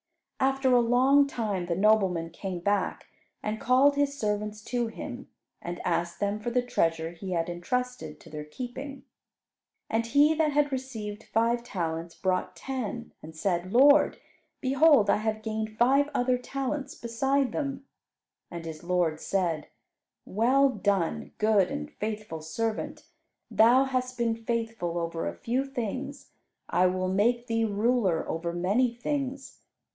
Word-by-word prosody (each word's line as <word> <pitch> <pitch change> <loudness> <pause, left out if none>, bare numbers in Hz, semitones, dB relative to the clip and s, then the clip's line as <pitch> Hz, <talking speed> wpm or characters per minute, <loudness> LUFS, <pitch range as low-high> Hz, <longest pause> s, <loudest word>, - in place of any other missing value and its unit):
After 270 -1 +2
a 245 - +6
long 260 +4 +4
time 205 -9 -2
the 170 - 0
nobleman 190 -4 +2
came 180 0 -5
back 200 +1 0 0.4
and 215 +1 -3
called 265 +4 +4
his 285 0 0
servants 210 -1 -2
to 240 0 -1
him, 250 +3 -7 0.3
and 175 0 -5
asked 170 0 -1
them 205 +1 -1
for 215 - -3
the 245 +1 +1
treasure 165 -8 0
he 180 +2 -6
had 165 -1 0
entrusted 175 -2 -3
to - - -15
their 150 -1 -5
keeping. 255 - -7 0.9
And 230 +1 +1
he 290 +5 +5
that 315 -1 +2
had 290 0 +2
received 225 -5 -5
five 235 +2 +1
talents, 165 -6 -4
brought 185 -1 -1
ten, 240 -3 -5
and 160 0 -11
said, 175 +1 -1
"Lord, 285 +5 +6 0.4
behold, 270 -5 +5
I - - +3
have 215 0 -2
gained 220 0 -3
five 275 +4 +4
other 250 0 +2
talents 275 +2 -4
beside 265 +3 0
them." 275 -2 -3 0.6
And 170 -2 -7
his 160 0 -7
lord 175 -3 +1
said, 170 -6 -1 0.6
"Well 255 +7 +3
done, 200 -8 -1
good 210 -4 +3
and 75 0 -5
faithful 210 -6 -5
servant; 215 +8 -3 0.5
thou 240 +4 +6
hast 255 -2 -2
been 230 -1 +1
faithful 225 -6 -3
over 165 -1 -2
a - - -4
few 250 +3 -1
things, 270 +1 -5 0.4
I 185 - +3
will 185 0 -1
make 235 +5 +2
thee 225 -1 +1
ruler 210 -4 +1
over 170 +1 -2
many 200 +9 +1
things. 270 +1 -4
225 Hz, 145 wpm, -28 LUFS, 185-255 Hz, 0.9 s, a